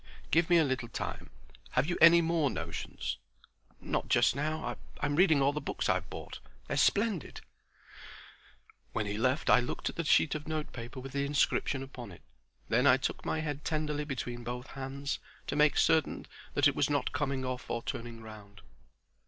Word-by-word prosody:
"Give 165 +1 +3
me 175 - +6
a 165 - +5
little 130 -4 -1
time. 115 - -5 0.4
Have - - +3
you 175 +2 -1
any 170 +1 +8
more 165 -3 +2
notions?" 80 -8 -4 0.6
"Not - - -2
just - - +4
now. 155 +2 -2 0.2
I'm 145 0 0
reading 160 -5 +5
all 140 +1 +3
the 150 - -3
books - - -2
I've - - 0
bought. - - -8 0.3
They're - - -2
splendid." 205 - +1 1.5
When 110 - -1
he 105 - -3
had 105 +2 -3
left 130 +2 +2
I - - +7
looked 125 - -3
at - - -20
the 170 - 0
sheet 155 0 +4
of 155 -1 -5
note 155 -1 -3
paper 120 +2 -7
with 135 +1 -8
the 140 +1 -1
inscription 140 -1 +1
upon 125 -5 -9
it. 85 - -14 0.4
Then - - +3
I - - +7
took - - -3
my 160 - -1
head 150 -2 -4
tenderly 150 -1 -1
between 125 -4 -4
both 125 +2 -6
hands, 135 +1 -4 0.3
to - - -3
make 150 0 +4
certain 160 -1 +2 0.3
that 145 0 +5
it 145 - +1
was - - +2
not 145 -1 0
coming 140 -2 -1
off 130 -1 -4
or 115 0 -2
turning 115 -1 -6
round. 100 -2 -12
140 Hz, 185 wpm, -31 LUFS, 125-155 Hz, 1.5 s, any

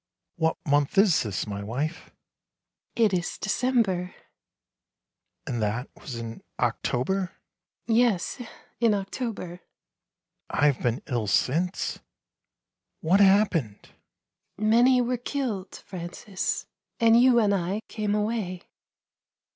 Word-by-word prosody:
" - - -61
What 160 -1 +1
month 145 +2 +2
is 195 -4 +5
this, 105 -5 -2
my 100 -1 -5
wife? 130 +9 -3 0.3
" - - -63
" - - -55
It 220 -4 +3
is 175 -1 -1
December." 210 -6 0 0.6
" - - -59
And 120 -3 -3
that 115 +5 -2
was 130 - -8
in 115 -1 -6 0.2
October? 185 +10 0 0.2
" - - -63
" - - -67
Yes, 230 -1 +2 0.4
in 230 -3 +4
October." 195 -3 -4 0.9
"I 145 - +1
have 145 -3 +2
been 120 +1 -1
ill 120 -6 -2
since? 165 - 0 1.0
What 180 +5 +3
happened?" 190 - +3 0.4
" - - -57
Many 240 +5 +4
were 245 +1 0
killed, 240 -6 -3
Francis, 180 +2 -4 0.3
and 230 +1 +6
you 250 -1 +6
and 205 -3 +3
I 195 +3 -1
came 210 -2 -1
away." 210 -4 -2
190 Hz, 125 wpm, -26 LUFS, 145-220 Hz, 1.0 s, and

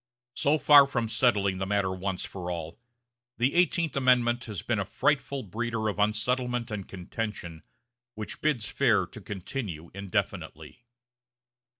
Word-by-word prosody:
So 145 +5 +2
far 145 -1 +8
from 120 -4 -1
settling 100 -5 +2
the 95 - -2
matter 100 -2 +1
once 95 0 -3
for 90 -2 -6
all, 85 0 -5 0.6
the 125 +3 +2
Eighteenth 170 -3 +2
Amendment 125 -3 +3
has 105 -6 -6
been - - 0
a - - +1
frightful 140 -2 0
breeder 115 +2 -2
of 105 - -4
unsettlement 120 +3 0
and 100 -3 -4
contention, 90 -3 -5 0.5
which 105 -1 -6
bids 135 -8 +1
fair - - +2
to - - -12
continue 95 - -6
indefinitely. 100 +4 -4
110 Hz, 135 wpm, -28 LUFS, 95-125 Hz, 0.6 s, far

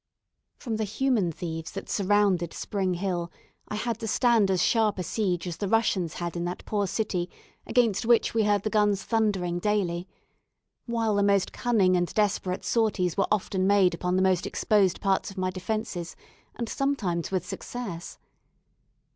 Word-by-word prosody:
From 230 -4 -3
the 220 - -1
human 215 -3 +1
thieves 160 0 -6
that - - -6
surrounded 195 -4 +1
Spring 190 -3 -1
Hill 175 -2 -2 0.4
I - - -4
had 230 +1 -2
to 225 - -4
stand 230 -3 +3
as 185 -1 +2
sharp 220 -3 +2
a 180 - -2
siege 180 -2 -1
as 170 - -4
the 205 - -2
Russians 190 -6 +1
had 175 0 -4
in 170 - -2
that 175 +1 -5
poor 205 -2 0
city 180 -4 -2 0.4
against 230 -6 +2
which 235 -1 +4
we 225 - +2
heard 205 -1 +2
the 215 - -2
guns 205 -2 +2
thundering 195 -6 0
daily; 185 -3 0 0.8
while 230 -2 0
the 200 - +2
most 200 -1 +2
cunning 205 -7 +2
and 175 -1 0
desperate 200 -3 0
sorties 210 -7 +1
were 195 - +1
often 190 -2 +1
made 195 -3 +4
upon 180 +2 -1
the 185 - +3
most 185 -2 +2
exposed 200 -4 +2
parts 195 -1 +1
of 195 - -12
my 185 0 0
defences, 185 -2 -4 0.4
and 235 - -3
sometimes 210 - -1
with 185 -2 -1
success. 200 -9 -6
195 Hz, 170 wpm, -27 LUFS, 180-220 Hz, 0.8 s, which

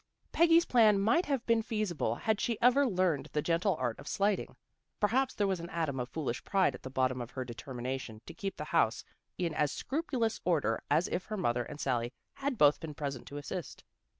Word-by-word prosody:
Peggy's 335 0 +5
plan 215 -5 +5
might 230 - +3
have 275 -4 -1
been 230 -1 +3
feasible 210 - -1
had 220 - 0
she 230 -2 -1
ever 265 +3 +5
learned 180 - 0
the 150 - +1
gentle 175 +3 +1
art 125 -5 -2
of 145 - -11
slighting. 200 0 0 0.4
Perhaps 255 +6 +2
there 205 - +1
was 190 -2 0
an 170 +1 -7
atom 160 -6 -2
of 125 0 -3
foolish 130 -5 -3
pride 195 -2 +2
at - - -10
the 130 - -7
bottom 130 -1 0
of 120 - -6
her 130 -1 -5
determination 125 -1 -5
to 165 - -9
keep 195 +2 -5
the - - -4
house - - +2 0.3
in 170 -3 -1
as 150 -1 +1
scrupulous 265 -6 -2
order 150 -10 +1
as 155 +5 +3
if 180 - -2
her 215 - -4
mother 120 -9 +1
and 150 +4 -9
Sally 120 -4 0 0.2
had 275 -2 -3
both 145 -4 +5
been 155 -2 -7
present 140 -5 -5
to 145 - -7
assist. 150 +2 -6
170 Hz, 205 wpm, -32 LUFS, 135-215 Hz, 0.4 s, Peggy's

